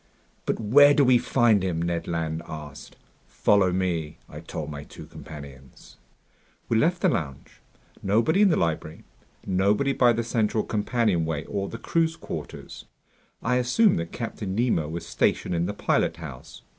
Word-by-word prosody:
"But - - 0
where 145 +7 +6
do 145 - +5
we 125 -1 +5
find 120 -4 +3
him?" 90 -3 -1
Ned 85 0 -2
Land 80 -1 -2
asked. 75 -3 -9 0.3
"Follow 100 -3 +2
me," 90 -4 -2
I - - -9
told 75 -1 -6
my 70 -1 -7
two 75 - -12
companions. 70 -4 -12 0.7
We 115 - 0
left 170 +8 +1
the - - +5
lounge. 70 -4 -5 0.4
Nobody 115 - +2
in 205 - +6
the 165 - +3
library. 80 -1 -2 0.4
Nobody 100 +9 +1
by 120 -3 +4
the 115 +1 -1
central 110 -2 0
companionway 100 - 0
or 100 -1 -3
the 115 - -6
crew's 165 +5 0
quarters. - - -8 0.6
I 125 +2 +2
assumed 125 - +3
that 85 0 -5
Captain 110 -5 -5
Nemo 105 -10 +1
was 85 +2 -5
stationed - - 0
in 85 0 0
the 100 - -3
pilothouse. 80 -9 -2
95 Hz, 155 wpm, -25 LUFS, 80-120 Hz, 0.7 s, where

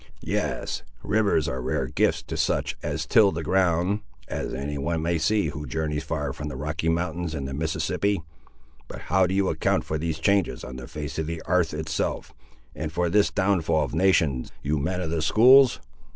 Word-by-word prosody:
"Yes; - - -2 0.2
rivers 100 -8 +2
are 65 0 -3
rare 65 - -1
gifts 65 - +1
to - - -6
such - - 0
as 80 +2 -3
till 100 +4 +5
the 80 -1 -4
ground, 90 +3 +2 0.3
as - - -4
any 70 +2 -4
one 80 +3 -1
may 85 0 0
see 100 0 +2
who 75 0 -6
journeys 75 +3 -2
far 75 -4 -2
atween 75 +1 -6
the 70 - -7
Rocky 75 +4 -2
Mountains 85 0 -1
and 70 -3 -4
the 65 - -5
Mississippi. 80 +6 0 0.7
But - - -8
how 95 -1 +5
do 95 - -2
you 100 -1 +2
account - - +1
for 80 - -3
these 80 0 -2
changes 100 +4 +1
on 65 - -7
the 60 -2 -8
face 75 0 -5
of 80 - -2
the 85 0 -4
'arth 90 -1 +1
itself, 80 0 -3 0.4
and 80 -1 -4
for 85 +1 0
this 105 0 +4
downfall 90 -6 +1
of - - -8
nations, 80 -7 +2
you 75 +1 0
men 90 +5 -1
of 80 -3 -3
the 80 -1 0
schools?" 125 - +6
80 Hz, 195 wpm, -25 LUFS, 75-95 Hz, 0.7 s, schools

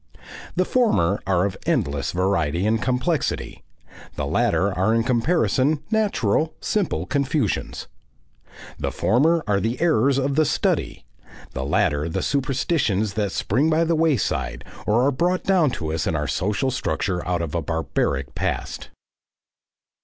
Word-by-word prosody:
The 185 +1 +2
former 145 - +2
are 95 -1 +2
of 100 - -2
endless 70 -1 0
variety 90 -2 0
and 110 0 +1
complexity; 130 +6 -1 0.5
the - - -2
latter 100 +1 +1
are 95 +5 +1
in 115 - +2
comparison 140 +3 +1
natural, 160 - +1
simple 205 -5 -1
confusions. 140 - -1 0.9
The - - -2
former 160 +8 +2
are 100 -1 +1
the 115 +5 -2
errors 140 -5 +3
of 140 +1 0
the 155 - +4
study, - - -1 0.5
the 65 - -4
latter 75 +2 +1
the - - -2
superstitions 130 - 0
that 105 -2 -1
spring 135 +13 +1
by 160 +1 +3
the 165 0 +1
wayside, 155 - 0 0.2
or 115 +4 +3
are 140 - +3
brought 175 +7 0
down 180 -6 +3
to 80 -2 -3
us 80 - -1
in 80 - 0
our 75 -1 -1
social 100 - 0
structure 90 -6 -2
out 90 -2 0
of 80 - -5
a 85 - 0
barbaric 70 -4 -2
past. - - -3
115 Hz, 145 wpm, -23 LUFS, -, 0.9 s, the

